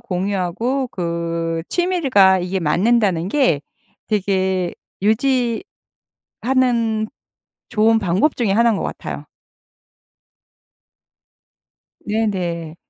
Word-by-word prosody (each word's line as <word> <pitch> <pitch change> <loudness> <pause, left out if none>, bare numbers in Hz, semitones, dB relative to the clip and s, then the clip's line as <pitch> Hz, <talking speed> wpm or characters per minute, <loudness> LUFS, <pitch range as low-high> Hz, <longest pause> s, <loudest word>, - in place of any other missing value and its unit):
공유하고 200 +8 -1
그 170 -3 -3
취미가 275 - +3
이게 185 +2 -2
맞는다는 185 +1 +2
게 250 - +2 0.5
되게 190 -3 0 1.5
유지하는 235 -4 0 0.6
좋은 225 0 +3
방법 200 - +1
중에 225 -5 +1
1 235 +3 +4
인 220 - +1
것 - - -3
같아요. - - -6 2.8
네네. 180 -7 -2
200 Hz, 160 characters per minute, -20 LUFS, 175-230 Hz, 2.8 s, 1